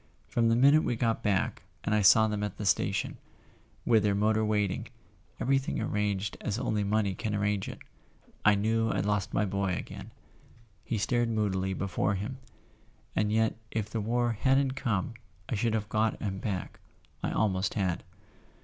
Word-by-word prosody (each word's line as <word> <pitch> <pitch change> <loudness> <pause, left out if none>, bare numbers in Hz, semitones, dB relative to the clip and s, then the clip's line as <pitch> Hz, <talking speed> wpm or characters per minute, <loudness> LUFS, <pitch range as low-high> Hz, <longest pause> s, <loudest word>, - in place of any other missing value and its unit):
From 115 -1 +2
the 115 - +4
minute 140 +5 +6
we 120 - 0
got 115 -1 0
back, 100 -4 0 0.2
and 105 - 0
I 105 - +3
saw 110 +3 +7
them 105 -1 -2
at 105 -2 -3
the 105 - -4
station, 95 - 0 0.7
with 110 -2 +5
their 100 -1 +2
motor 110 +2 +2
waiting, 105 -3 0
and - - -19 0.5
everything 135 +1 +1
arranged 100 -1 -1
as 105 - -2
only 105 -3 0
money 100 -1 +1
can 105 +2 -3
arrange 105 -1 0
it, - - -7 0.7
I 105 0 +6
knew 115 +2 +1
I'd 95 -3 0
lost 105 -2 0
my 105 - +1
boy 100 -1 -1
again." - - -7 0.7
He 115 - -2
stared 120 +3 +1
moodily 95 -4 0
before 100 +1 0
him. 115 +7 -5 0.8
"And 105 0 +1
yet 110 0 +2
if 110 -2 -3
the 110 - -1
war 120 +2 +1
hadn't 135 +4 +2
come 120 -6 -1 0.3
I - - -3
should 115 +1 +1
have 105 -2 -2
got 110 0 0
him 95 -2 -3
back—I 95 -3 -6
almost 95 -3 0
had." 95 -5 -1
105 Hz, 170 wpm, -29 LUFS, 100-115 Hz, 0.8 s, saw